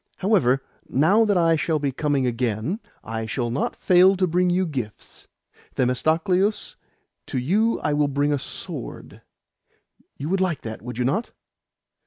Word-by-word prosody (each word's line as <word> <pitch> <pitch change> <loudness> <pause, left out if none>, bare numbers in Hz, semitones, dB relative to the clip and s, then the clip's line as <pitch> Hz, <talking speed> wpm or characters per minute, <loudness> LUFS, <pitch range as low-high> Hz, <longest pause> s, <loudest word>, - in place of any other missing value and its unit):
However, 135 - +2 0.3
now 190 - +4
that 205 -3 +2
I 165 -1 +4
shall 160 0 0
be 140 -2 -1
coming 140 -1 0
again, 120 - -1 0.2
I 115 0 -4
will 120 -2 -1
not 130 - -1
fail 185 +1 +5
to 185 - +2
bring 180 +1 +1
you 185 +1 +2
gifts. 125 - -7 0.5
Themistocleus, 165 - +1 0.5
to - - -3
you 205 - +1
I 150 - 0
will 145 0 +2
bring 145 +1 +1
a 145 - 0
sword. - - -8 1.0
You 145 - -4
would 190 +1 +1
like 180 -5 0
that, 110 -1 -7
would 125 +1 -7
you 125 - 0
not?" 195 - -1
150 Hz, 155 wpm, -23 LUFS, 125-185 Hz, 1.0 s, fail